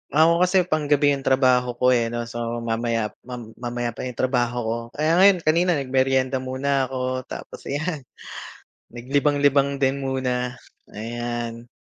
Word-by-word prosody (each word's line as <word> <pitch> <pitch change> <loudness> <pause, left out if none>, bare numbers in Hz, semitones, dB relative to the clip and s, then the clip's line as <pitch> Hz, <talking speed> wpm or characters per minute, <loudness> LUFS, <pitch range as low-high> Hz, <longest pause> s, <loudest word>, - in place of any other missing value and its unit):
Ako 165 +2 +5
kasi, 185 +1 +4
panggabi 150 -3 +2
'yung 140 -1 -3
trabaho 125 -2 +3
ko, 125 +1 +3
eh 120 -2 +2
'no. 120 0 -3
So, 120 0 -4
mamaya 115 -1 -1 0.2
mam 120 -3 -8
mamaya 120 0 -3
pa 120 - -6
'yung 125 - -7
trabaho 125 -1 0
ko 110 +1 -1 0.2
kaya 155 +3 +2
ngayon 190 -3 +6
kanina 170 +3 +3
nagmeryenda 130 -1 +1
muna 130 +1 -1
ako 130 0 -3
tapos - - -9
'yan. 145 -1 -3 0.8
Naglibang-libang 140 +2 +1
din 135 0 0
muna, 125 -1 -2 0.3
ayan. 120 +1 -5
130 Hz, 140 wpm, -23 LUFS, 120-145 Hz, 0.8 s, ngayon